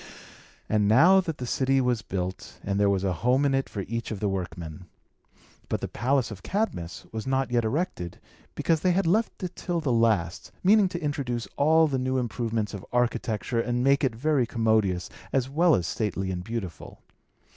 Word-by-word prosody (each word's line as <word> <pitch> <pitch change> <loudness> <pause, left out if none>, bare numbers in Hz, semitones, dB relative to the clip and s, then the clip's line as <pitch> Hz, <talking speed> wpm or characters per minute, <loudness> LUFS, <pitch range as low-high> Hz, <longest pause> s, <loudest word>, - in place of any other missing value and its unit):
And 105 -1 +2
now 170 - +6
the 160 -8 -4
city 135 +2 +1
was 125 -3 +1
built, 95 -2 -5
and 100 0 -1
there 100 -1 +4
was 100 -1 +1
a 95 -2 +1
home 130 +4 +3
in 140 - +2
it 135 0 0
for 100 - -4
each 115 +4 -4
of 110 - -4
the 105 - 0
workmen. 90 -3 -5 0.8
But - - -1
the - - -3
palace 130 -2 0
of 100 -3 -8
Cadmus 190 - -3
was 110 +1 -5
not 130 -1 0
yet 120 -1 +2
erected, 110 - -2 0.4
because 165 -1 +1
they 180 +2 +2
had 195 +1 +1
left 210 +4 +1
it 180 -1 -4
till 175 -2 -2
the 150 -5 -1
last, 110 -7 +1
meaning 200 0 +5
to 175 - -4
introduce 135 -6 -2
all 160 +3 +4
the 135 -4 -1
new 130 +1 0
improvements 115 -3 -2
of 100 -2 -6
architecture, 120 -1 0
and 120 +1 -1
make 140 +2 +3
it 125 -4 +1
very 135 0 +1
commodious, 110 -6 +1 0.2
as 130 -1 0
well 165 +2 +4
as 85 - -1
stately 95 +2 -2
and 90 -1 -4
beautiful. 95 -7 -6
120 Hz, 190 wpm, -26 LUFS, 100-140 Hz, 0.8 s, now